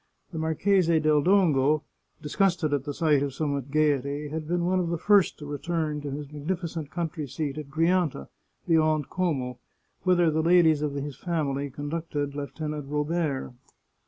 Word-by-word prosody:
The 160 Hz, -, -4 dB
Marchese 165 Hz, +1 st, +2 dB
del 155 Hz, -1 st, +3 dB
Dongo, 155 Hz, -6 st, +3 dB, 0.4 s
disgusted 175 Hz, -1 st, +1 dB
at 140 Hz, -1 st, -1 dB
the 145 Hz, -, -3 dB
sight 155 Hz, -4 st, +3 dB
of 140 Hz, -2 st, -2 dB
so 155 Hz, -, -1 dB
much 140 Hz, -2 st, -2 dB
gaiety, 145 Hz, -1 st, +1 dB
had 155 Hz, 0 st, -5 dB
been 175 Hz, +1 st, 0 dB
one 185 Hz, +1 st, +2 dB
of 175 Hz, -2 st, -1 dB
the 170 Hz, -, -1 dB
first 200 Hz, +2 st, +3 dB
to 150 Hz, -, -9 dB
return 150 Hz, +1 st, -2 dB
to 145 Hz, -, -5 dB
his 145 Hz, +1 st, -6 dB
magnificent 160 Hz, 0 st, -4 dB
country 160 Hz, -3 st, -4 dB
seat 145 Hz, +2 st, -4 dB
at 145 Hz, -2 st, -8 dB
Grianta, 165 Hz, -, +1 dB, 0.4 s
beyond 155 Hz, -3 st, +2 dB
Como, 135 Hz, -9 st, -1 dB, 0.4 s
whither 175 Hz, -3 st, +3 dB
the 160 Hz, +1 st, +1 dB
ladies 165 Hz, -2 st, +4 dB
of 145 Hz, -2 st, -2 dB
his 140 Hz, 0 st, -4 dB
family 145 Hz, -5 st, -2 dB
conducted 145 Hz, +1 st, -4 dB
Lieutenant 150 Hz, 0 st, -5 dB
Robert. 150 Hz, -2 st, -1 dB
155 Hz, 160 wpm, -27 LUFS, 145-170 Hz, 0.4 s, ladies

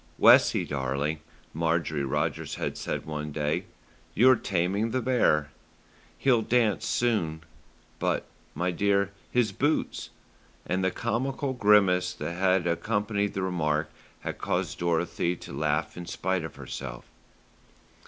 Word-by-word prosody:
"Wessie, -, -, +6 dB
darling," 70 Hz, +3 st, -1 dB, 0.3 s
Marjorie 80 Hz, -2 st, 0 dB
Rogers 65 Hz, -, -2 dB
had -, -, -3 dB
said -, -, -4 dB
one 75 Hz, -1 st, -4 dB
day, 75 Hz, 0 st, -1 dB, 0.5 s
"you're 130 Hz, +3 st, +7 dB
taming 100 Hz, +2 st, 0 dB
the 130 Hz, +3 st, 0 dB
bear. 110 Hz, -, +2 dB, 0.7 s
He'll 125 Hz, -4 st, +3 dB
dance 115 Hz, -1 st, +1 dB
soon; 85 Hz, -10 st, 0 dB, 0.6 s
but, -, -, 0 dB, 0.3 s
my 90 Hz, +1 st, 0 dB
dear, 100 Hz, +1 st, +1 dB, 0.2 s
his 120 Hz, -4 st, +2 dB
boots," 145 Hz, +10 st, -1 dB, 0.6 s
and 95 Hz, +1 st, -1 dB
the 95 Hz, -, +3 dB
comical 130 Hz, +6 st, -2 dB
grimace 100 Hz, -6 st, +4 dB
that 85 Hz, -, -4 dB
had 95 Hz, 0 st, +2 dB
accompanied 100 Hz, +4 st, 0 dB
the 95 Hz, -, -1 dB
remark 75 Hz, -4 st, 0 dB, 0.3 s
had -, -, -5 dB
caused -, -, -2 dB
Dorothy 85 Hz, +1 st, 0 dB
to -, -, -10 dB
laugh 75 Hz, +2 st, -1 dB
in 90 Hz, -1 st, -7 dB
spite 95 Hz, 0 st, -1 dB
of 80 Hz, -, -7 dB
herself. -, -, -7 dB
90 Hz, 125 wpm, -27 LUFS, 80-105 Hz, 0.7 s, you're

